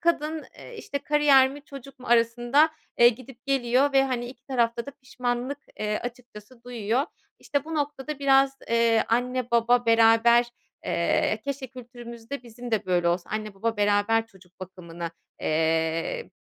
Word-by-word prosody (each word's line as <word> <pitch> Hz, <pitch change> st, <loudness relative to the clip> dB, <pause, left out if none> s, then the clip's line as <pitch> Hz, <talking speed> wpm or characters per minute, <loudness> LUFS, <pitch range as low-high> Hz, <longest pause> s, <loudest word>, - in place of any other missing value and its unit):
kadın, 315 Hz, -2 st, 0 dB
eee, 480 Hz, -, -11 dB
işte, 285 Hz, -9 st, -5 dB
kariyer 285 Hz, -2 st, +4 dB
mi 285 Hz, +1 st, -11 dB
çocuk 275 Hz, -1 st, -12 dB
mu 255 Hz, -, -12 dB
arasında, 240 Hz, +6 st, +3 dB, 0.3 s
eee, 240 Hz, 0 st, +8 dB
gidip 255 Hz, +2 st, -8 dB
geliyor. 270 Hz, +1 st, +2 dB
Ve 270 Hz, 0 st, +4 dB
hani 245 Hz, -2 st, -2 dB
2 250 Hz, +1 st, -12 dB
tarafta 235 Hz, -2 st, 0 dB
da -, -, -6 dB
pişmanlık, 255 Hz, 0 st, -4 dB, 0.2 s
eee, 210 Hz, 0 st, -1 dB
açıkçası 240 Hz, -1 st, -10 dB
duyuyor. 240 Hz, +1 st, -1 dB, 0.4 s
İşte, 285 Hz, -1 st, -2 dB
bu 320 Hz, +1 st, -6 dB
noktada 290 Hz, -1 st, -3 dB
biraz, 270 Hz, -1 st, +3 dB
eee, 230 Hz, -1 st, +3 dB
anne 245 Hz, +1 st, -1 dB
baba 235 Hz, +1 st, +3 dB
beraber 230 Hz, +1 st, +5 dB, 0.4 s
eee, 175 Hz, +5 st, 0 dB
keşke 280 Hz, -1 st, -4 dB
kültürümüzde 240 Hz, 0 st, -9 dB
bizim 240 Hz, +1 st, -10 dB
de 215 Hz, -4 st, -1 dB
böyle 175 Hz, -1 st, +2 dB
olsa, 175 Hz, +1 st, -2 dB
anne 215 Hz, -2 st, -4 dB
baba 225 Hz, +3 st, -2 dB
beraber 205 Hz, +2 st, +2 dB
çocuk 185 Hz, -3 st, -22 dB
bakımını, 170 Hz, -2 st, -7 dB, 0.3 s
eee, 160 Hz, -, -1 dB
240 Hz, 150 wpm, -25 LUFS, 225-270 Hz, 0.4 s, eee